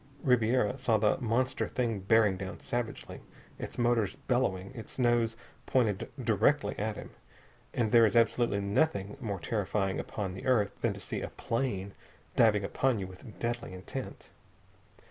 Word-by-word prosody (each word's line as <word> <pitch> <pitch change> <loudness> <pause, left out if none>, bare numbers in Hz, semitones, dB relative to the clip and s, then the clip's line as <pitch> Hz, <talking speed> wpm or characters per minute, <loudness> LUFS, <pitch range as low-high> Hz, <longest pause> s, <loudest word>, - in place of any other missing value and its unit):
Ribiera 125 -2 +2
saw 120 -3 +3
the 105 0 +2
monster 125 +1 0
thing 115 -5 -1
bearing 105 0 +4
down 95 +1 -6
savagely, 120 -2 -4 0.4
its - - -6
motors 120 -4 +2
bellowing, 120 -6 -1
its 115 -4 -7
nose 120 -3 +2 0.3
pointed 110 -7 +1 0.2
directly - - +3
at - - -1
him. - - -9 0.6
And 110 -3 0
there 115 -2 +7
is 110 - -2
absolutely 115 -3 +3
nothing 100 -1 0
more 100 -5 -3
terrifying 100 0 -1
upon 100 -4 -4
the 95 - -7
earth 110 -6 +3
than - - +1
to - - -9
see - - -4
a - - -4
plane 100 -6 -2 0.4
diving 105 -3 +4
upon 130 +5 +1
you 95 - -3
with 95 +4 -12
deadly 120 -3 -3
intent. 95 0 -7
110 Hz, 150 wpm, -30 LUFS, 100-120 Hz, 0.6 s, there